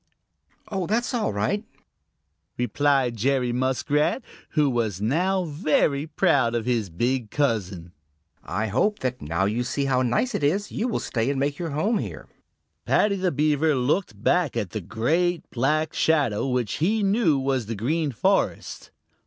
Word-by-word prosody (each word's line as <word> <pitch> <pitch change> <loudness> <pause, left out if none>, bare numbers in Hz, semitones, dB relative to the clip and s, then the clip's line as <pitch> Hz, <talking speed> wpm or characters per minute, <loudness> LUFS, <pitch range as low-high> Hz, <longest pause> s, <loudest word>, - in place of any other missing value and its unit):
"Oh, 190 -4 -2
that's 235 +5 0
all 235 - 0
right," 110 - -1 0.9
replied 130 +1 +1
Jerry 125 +1 +1
Muskrat, 130 - 0 0.3
who 150 -2 +3
was 115 -7 -1
now 180 - +1
very 150 -2 +1
proud 125 -6 +2
of 115 -2 -1
his 115 -5 0
big 120 +6 -1
cousin. 100 - -1 0.5
"I 110 - -2
hope 130 - +1
that 125 -1 -2
now 85 +5 -1
you 110 +5 0
see 140 +3 -2
how 130 -2 +2
nice 130 - 0
it - - -2
is, 195 +8 +1
you 230 - -1
will 235 - -1
stay 115 +1 -1
and 140 -1 -1
make 140 +1 -1
your 170 -2 -3
home 200 +10 0
here." - - -6 0.6
Paddy 205 -1 +3
the 185 -2 0
Beaver 150 +1 +2
looked 125 - -1
back 175 -7 +2
at 105 -6 -2
the 110 - -4
great 165 - 0
black 150 +5 0
shadow 140 -8 +1
which 125 -4 -1
he 210 +6 +2
knew 195 -7 +3
was 135 -4 -1
the 115 - -3
Green 145 +8 -1
Forest. 115 - -1
135 Hz, 160 wpm, -24 LUFS, 120-165 Hz, 0.9 s, who